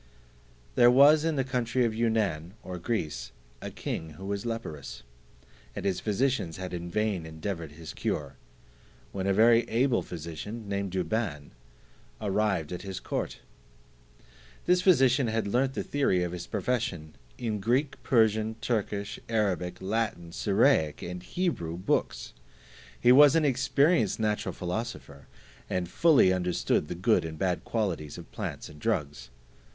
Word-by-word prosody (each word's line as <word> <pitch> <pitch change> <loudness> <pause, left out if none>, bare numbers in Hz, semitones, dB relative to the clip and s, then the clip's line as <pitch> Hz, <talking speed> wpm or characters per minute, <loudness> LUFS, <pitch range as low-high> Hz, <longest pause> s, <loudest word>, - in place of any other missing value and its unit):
There 120 - +6
was 145 +5 +7
in 165 -1 0
the 135 - +1
country 125 -1 0
of 115 - 0
Yunaun 105 -8 0
or 90 -1 -6
Greece, 75 - -3 0.3
a - - -5
king 80 -1 -5
who 95 - -8
was 100 +3 -3
leprous, 75 - -6 0.7
and - - -5
his 95 -2 0
physicians 110 -5 0
had 95 -1 -6
in 85 0 -5
vain 105 -2 0
endeavoured 80 0 -5
his 80 +1 -9
cure; 70 -2 -3 0.8
when 95 -1 -3
a - - +3
very 115 +4 +6
able 125 +2 +2
physician, 90 +7 -7
named 100 -1 -2
Douban, 90 -5 -2 0.7
arrived 100 -6 0
at 90 - -4
his 95 -2 -6
court. - - -4 1.2
This 180 0 +4
physician 135 -8 +4
had 110 -1 -1
learnt 130 +6 +1
the - - -2
theory 115 -11 +1
of 90 - -3
his 90 -1 -6
profession 100 -8 -2 0.2
in 110 -3 -2
Greek, 130 +8 0
Persian, 110 -2 +2
Turkish, 105 -3 -2
Arabic, 95 -6 0
Latin, 100 -5 -2
Syriac, 80 -6 +2
and 90 0 -5
Hebrew 90 - -2
books; 90 - -1 0.7
he 120 - +5
was 145 +3 +8
an 160 -2 +3
experienced 140 - +2
natural 105 -1 -1
philosopher, 90 - -5 0.4
and 90 -1 -1
fully 140 - +5
understood 90 -4 0
the - - -5
good 110 +6 +2
and 80 -1 -6
bad 90 +1 -1
qualities 90 -10 -2
of - - -11
plants - - -5
and 75 -1 -13
drugs. 75 - -2
100 Hz, 145 wpm, -28 LUFS, 85-120 Hz, 1.2 s, was